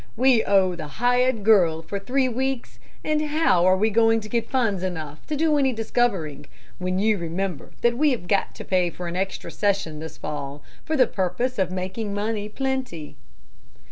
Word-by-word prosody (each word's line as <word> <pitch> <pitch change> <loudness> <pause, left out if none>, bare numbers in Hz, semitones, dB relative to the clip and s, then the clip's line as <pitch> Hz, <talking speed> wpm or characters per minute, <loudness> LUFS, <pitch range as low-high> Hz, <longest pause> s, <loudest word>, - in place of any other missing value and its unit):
We 250 -2 +4
owe 190 -2 +3
the 165 -3 -6
hired 245 -1 +2
girl 175 -7 +4
for 200 +5 -4
three 260 +6 +1
weeks; 250 - -3 0.2
and 305 0 +1
how 300 - +2
are 185 0 +5
we 215 +3 +2
going 225 +1 +4
to 215 - -9
get 230 0 -1
funds 225 -8 +1
enough 160 -5 -5
to 300 - -2
do 305 0 +2
any 265 -2 +2
discovering, 195 - -1 0.3
when 185 0 -1
you 210 +1 +2
remember 170 -1 -4
that 235 +1 +2
we 305 0 +4
have 235 -10 -2
got 200 - +1
to - - -8
pay 180 -2 +2
for 175 +1 -7
an 170 - -4
extra 190 +1 -3
session 195 -7 -1
this 160 0 -8
fall 145 -1 -6 0.2
for 315 -1 -1
the 255 - +6
purpose 200 +6 -2
of 185 -2 +2
making 190 +3 -4
money 210 0 -2
plenty?" 260 - -3
205 Hz, 185 wpm, -24 LUFS, 180-245 Hz, 0.3 s, the